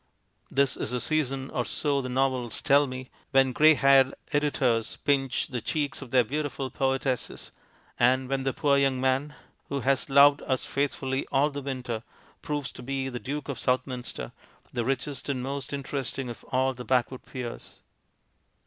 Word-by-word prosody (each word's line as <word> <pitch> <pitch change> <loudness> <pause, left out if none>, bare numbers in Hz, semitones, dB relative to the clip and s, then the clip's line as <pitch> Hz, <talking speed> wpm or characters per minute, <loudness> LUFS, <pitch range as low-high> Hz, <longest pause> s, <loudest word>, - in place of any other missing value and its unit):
This 135 -2 +2
is - - -2
the 125 +1 -1
season, 135 -2 -1
or 125 - 0
so 140 +2 0
the 130 - -5
novels 130 -2 0
tell 140 0 +4
me, 130 0 -7 0.2
when 135 -2 +4
grey 155 +4 +6
haired 135 -1 +5 0.2
editors 130 -6 +1
pinch 135 -3 +1
the 125 -3 -3
cheeks 145 +4 -2
of 135 - -8
their 125 0 +4
beautiful 140 +1 -3
poetesses, 135 -2 -1 0.5
and 130 +2 +3
when 135 0 -1
the 135 - +1
poor 140 +1 +2
young 135 -2 +2
man, 135 +3 0 0.3
who 140 -1 -2
has 135 +2 +1
loved 140 +1 +7
us 130 -2 0
faithfully 135 -1 -1
all 145 +3 +3
the 145 0 -5
winter, 130 -4 -4 0.4
proves 145 -4 -3
to - - -10
be 135 +1 -2
the 125 -1 -5
Duke 140 +2 -4
of 140 - -4
Southminster, 125 - -2 0.4
the 120 - 0
richest 135 +3 -2
and 130 -3 -1
most 135 0 -4
interesting 135 -2 -3
of 115 - -11
all 130 +1 +1
the 125 0 -8
backwood 125 +1 0
peers. 125 -3 -8
135 Hz, 165 wpm, -27 LUFS, 130-140 Hz, 0.5 s, loved